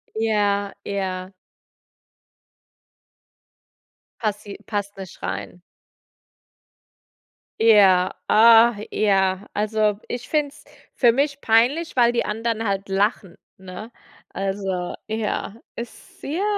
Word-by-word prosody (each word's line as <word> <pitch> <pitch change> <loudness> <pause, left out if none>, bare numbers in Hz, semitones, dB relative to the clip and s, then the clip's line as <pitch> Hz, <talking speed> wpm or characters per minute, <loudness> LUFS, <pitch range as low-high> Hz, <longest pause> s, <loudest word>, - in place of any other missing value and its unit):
Ja, 205 -2 0
ja. 190 -1 -4 2.9
Passi 210 -2 -4
passt 205 -1 -4
nicht 190 -2 -10
rein. 180 - -5 2.0
Ja, 195 -5 +5
ah, 230 +1 +6 0.2
ja, 195 -1 +1
also, 210 0 0
ich 240 0 -5
finde 300 -2 +1
es 300 +2 -18 0.3
für 240 -3 +5
mich 280 +3 -1
peinlich, 260 +9 +2
weil 240 -1 +4
die 240 - -1
anderen 225 +1 -2
halt 195 0 -2
lachen, 195 -1 -1 0.2
ne, 190 +4 -10 0.4
also 195 -2 -3
ja, 220 -1 -3 0.2
ist 235 0 -10
sehr 330 +8 -3
210 Hz, 95 wpm, -22 LUFS, 195-230 Hz, 2.9 s, ah